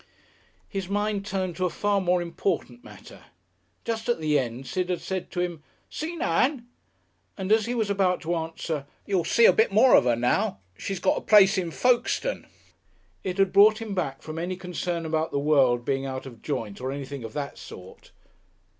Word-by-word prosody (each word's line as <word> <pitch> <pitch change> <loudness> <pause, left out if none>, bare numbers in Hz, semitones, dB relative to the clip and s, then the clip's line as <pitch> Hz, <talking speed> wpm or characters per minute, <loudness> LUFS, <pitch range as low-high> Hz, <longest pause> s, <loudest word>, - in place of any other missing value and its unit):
His 195 -2 -5
mind 205 0 -1
turned 185 -4 -2
to 185 - 0
a - - +1
far 205 +2 0
more 180 -1 +1
important 170 -7 -3
matter. - - -14 0.6
Just 230 0 -3
at 240 - +1
the 150 -2 +2
end 125 +1 -4
Sid 180 +7 -2
had 180 - -1
said 190 -1 -4
to 175 - -3
him, 175 -3 -3 0.3
"Seen 325 +1 -4
Ann?" 240 - +1 0.7
and 190 +1 -3
as 220 0 +4
he 245 - -2
was 220 -3 0
about 190 -2 +2
to 170 +2 -2
answer, 160 -3 -4 0.2
"You'll 190 -4 0
see 465 - +4
a - - +7
bit 450 +2 +3
more 260 - +5
of - - +5
her 120 -1 +3
now. 120 -3 0 0.2
She's 195 - -4
got - - +1
a - - -13
place 200 -2 +6
in 180 -3 -1
Folkestone." 250 - 0 0.8
It 185 0 -3
had 195 -1 +2
brought 210 +2 +6
him 225 -3 -5
back 135 -8 -3
from 155 +1 -6
any 180 +2 -3
concern 180 -2 -4
about 160 0 -1
the - - -2
world 135 -5 +3
being 135 +1 -1
out 130 0 -5
of 120 -4 -11
joint 105 0 -4
or 130 +1 -2
anything 140 -1 -6
of 110 -1 -7
that 140 -1 -5
sort. 90 0 -12
180 Hz, 195 wpm, -26 LUFS, 140-200 Hz, 0.8 s, a